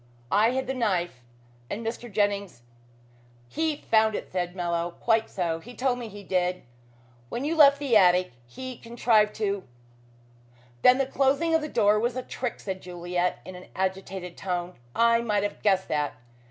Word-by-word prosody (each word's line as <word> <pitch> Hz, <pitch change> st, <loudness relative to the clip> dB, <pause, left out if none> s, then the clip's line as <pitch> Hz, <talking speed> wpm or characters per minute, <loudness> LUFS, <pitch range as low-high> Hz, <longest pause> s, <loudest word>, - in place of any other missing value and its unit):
I 215 Hz, +3 st, +4 dB
hid 260 Hz, +1 st, -1 dB
the 265 Hz, -, -2 dB
knife 180 Hz, -, -1 dB, 0.5 s
and 225 Hz, +3 st, -4 dB
Mr. 235 Hz, +1 st, -5 dB
Jennings 200 Hz, -, -1 dB, 0.4 s
" 120 Hz, 0 st, -30 dB
"He 320 Hz, -1 st, +1 dB
found 220 Hz, -5 st, +2 dB
it," -, -, -6 dB
said 180 Hz, -1 st, -2 dB
Mallow. 170 Hz, -1 st, -2 dB
"Quite 225 Hz, -1 st, +2 dB
so. 170 Hz, -3 st, -2 dB
He 240 Hz, +8 st, -12 dB
told 250 Hz, -1 st, 0 dB
me 235 Hz, -, -5 dB
he 205 Hz, -1 st, -10 dB
did. 180 Hz, -1 st, 0 dB, 0.7 s
When 250 Hz, +4 st, -3 dB
you 320 Hz, +3 st, 0 dB
left 285 Hz, -3 st, +7 dB
the 280 Hz, -5 st, 0 dB
attic 180 Hz, -2 st, +5 dB, 0.2 s
he 255 Hz, -, -8 dB
contrived 230 Hz, -2 st, +2 dB
to 200 Hz, -3 st, -1 dB, 0.6 s
" 120 Hz, 0 st, -30 dB
"Then 250 Hz, 0 st, +7 dB
the 270 Hz, -, +1 dB
closing 280 Hz, +5 st, +1 dB
of 320 Hz, -, +4 dB
the 305 Hz, -, -4 dB
door 210 Hz, -3 st, +3 dB
was 240 Hz, +2 st, -1 dB
a 255 Hz, -, -3 dB
trick," 245 Hz, -1 st, -4 dB
said 190 Hz, -2 st, -5 dB
Juliet 175 Hz, 0 st, -2 dB
in 185 Hz, -, -8 dB
an 180 Hz, 0 st, -11 dB
agitated 190 Hz, -1 st, -3 dB
tone. 180 Hz, -1 st, -3 dB, 0.2 s
"I 230 Hz, 0 st, +4 dB
might 210 Hz, -3 st, 0 dB
have 205 Hz, -, -4 dB
guessed 190 Hz, -2 st, +2 dB
that. 150 Hz, -1 st, -1 dB
205 Hz, 180 wpm, -26 LUFS, 180-240 Hz, 0.7 s, left